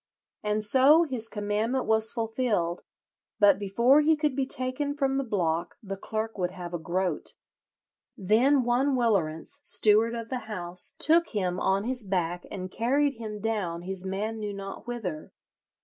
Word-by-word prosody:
And 210 0 -1
so 270 +9 +5
his 250 -8 -2
commandment 215 +5 -1
was 220 0 +2
fulfilled; 225 -7 -1 0.6
but 200 -2 +5
before 235 +8 +4
he 315 +1 +4
could 300 -3 -1
be 270 -1 0
taken 255 +3 -2
from 270 -2 0
the 275 - 0
block 175 -7 -1
the 195 -1 -5
clerk 220 +2 -4
would 180 -1 0
have 180 -2 -8
a 175 - -2
groat. 175 0 -2 0.8
Then 245 +8 +3
one 255 +3 +2
Willerence, 200 - 0
steward 225 -3 +3
of 230 -1 -6
the 255 -4 -4
house, 180 -3 -2
took 335 +2 +4
him 185 -4 -2
on 195 +1 +1
his 250 0 -2
back 180 -3 -2
and 185 -1 -6
carried 275 +5 +1
him 215 -2 -6
down 195 -6 -2
his 190 0 -4
man 205 +4 -3
knew 205 -1 -4
not 195 +3 -8
whither. 190 -11 -5
215 Hz, 160 wpm, -27 LUFS, 190-255 Hz, 0.8 s, so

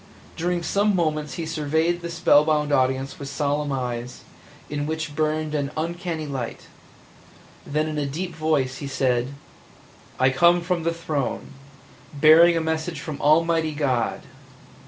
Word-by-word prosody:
During 175 +1 -1
some 200 +3 +1
moments 155 -4 -1
he 165 - -4
surveyed 160 +2 0
the 170 - -5
spellbound 150 -3 +3
audience 130 0 0
with 140 -1 -6
solemn 145 +1 -1
eyes, 125 -2 -4 0.5
in 145 0 -3
which 155 -1 -4
burned 155 0 -1
an 140 -2 -1
uncanny 165 0 -3
light; 135 -5 -5 1.0
then 155 +2 0
in 155 -1 -3
a 145 - -1
deep 170 +5 -4
voice 155 -5 0
he 140 - -6
said: 130 -1 0 0.8
"I 130 0 +4
come 170 +6 +4
from 175 0 -1
the 165 +1 0
Throne 155 -5 -3 0.3
– - - -24
bearing 165 +3 +7
a - - +1
message 160 0 -2
from 150 -1 -6
Almighty 160 +1 +3
God!" 130 -6 -1
155 Hz, 145 wpm, -24 LUFS, 140-165 Hz, 1.0 s, bearing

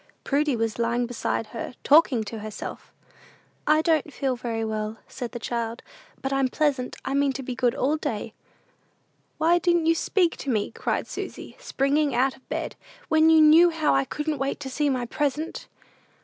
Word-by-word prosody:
Prudy 290 -1 +1
was 225 0 -2
lying 235 +1 +1
beside 235 -1 -2
her, 235 +1 -5
talking 285 -6 +5
to 220 +1 -7
herself. 215 0 -7 0.8
"I 310 +1 +4
don't 315 -3 +1
feel 270 -2 -1
very 230 -2 -3
well," 215 0 -3
said 245 -4 -6
the - - -5
child; 235 0 -3 0.4
"but 270 0 -1
I'm 270 -1 +2
pleasant; 275 -2 0
I - - -2
mean 280 -1 +2
to 270 - -5
be 255 - -4
good 245 -1 +1
all 290 +4 +1
day." 230 -7 -4 1.0
"Why 340 +2 +3
didn't 345 -2 +2
you 330 - +5
speak 350 +1 +1
to 280 - -5
me?" 215 -5 0
cried - - -2
Susy, - - -7
springing 280 +1 +1
out 260 +2 +2
of 260 - -25
bed, - - -3 0.3
"when 315 0 +5
you 320 -1 +7
knew 320 +3 +7
how 320 - +1
I 135 0 +2
couldn't 300 - -3
wait 275 +1 -2
to 265 -2 -5
see 295 +2 +1
my 255 -3 -1
present?" 295 +5 -2
270 Hz, 180 wpm, -25 LUFS, 235-305 Hz, 1.0 s, you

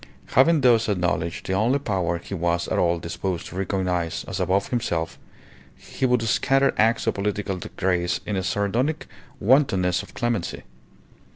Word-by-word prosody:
Having 150 +4 +5
thus 115 -3 +4
acknowledged 90 -3 -1
the 95 - -2
only 115 +8 +2
power 95 -10 -1
he 85 - -9
was 85 -1 0
at - - 0
all 85 -1 +2
disposed 85 +1 -4
to - - -9
recognize 90 -3 -1
as 95 - -4
above 95 +2 +1
himself, 85 -10 -2 0.6
he 130 - -3
would 125 -2 +2
scatter 135 +4 +2
acts 115 +2 +2
of 115 - +1
political 100 -1 -2 0.2
grace 90 -2 0
in 105 - -2
a 95 - 0
sardonic 105 - -1 0.3
wantonness 95 -8 +3
of 100 - -14
clemency. 120 -6 -2
95 Hz, 155 wpm, -24 LUFS, 90-115 Hz, 0.6 s, Having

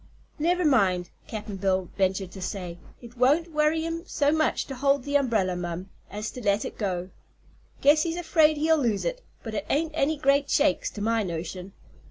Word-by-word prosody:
"Never 350 +3 +1
mind," 190 - +2 0.2
Cap'n 210 -2 -6
Bill 190 -2 0
ventured 190 -1 0
to 190 - -9
say, 180 -2 -5 0.2
"it 240 +1 -12
won't 300 +7 +3
worry 305 +1 +2
him 330 0 -3
so 290 0 +1
much 315 0 +1
to 270 - -7
hold 275 +1 +1
the 285 +1 -3
umbrella, 220 -10 +2
mum, 175 +1 -5 0.2
as 210 +2 -5
to 250 - -8
let 205 -1 +1
it - - -6
go. 185 -3 -2 0.7
Guess 295 +2 +5
he's 335 +1 -1
afraid 320 -3 +3
he'll 315 +1 +3
lose 230 -7 0
it, - - -2 0.2
but 225 - -6
it 205 -1 -3
ain't 310 +2 +1
any 310 0 +1
great 280 0 +2
shakes, 290 0 +2
to 210 - -8
my 225 +1 +1
notion. 180 +1 -5
240 Hz, 190 wpm, -26 LUFS, 190-300 Hz, 0.7 s, Guess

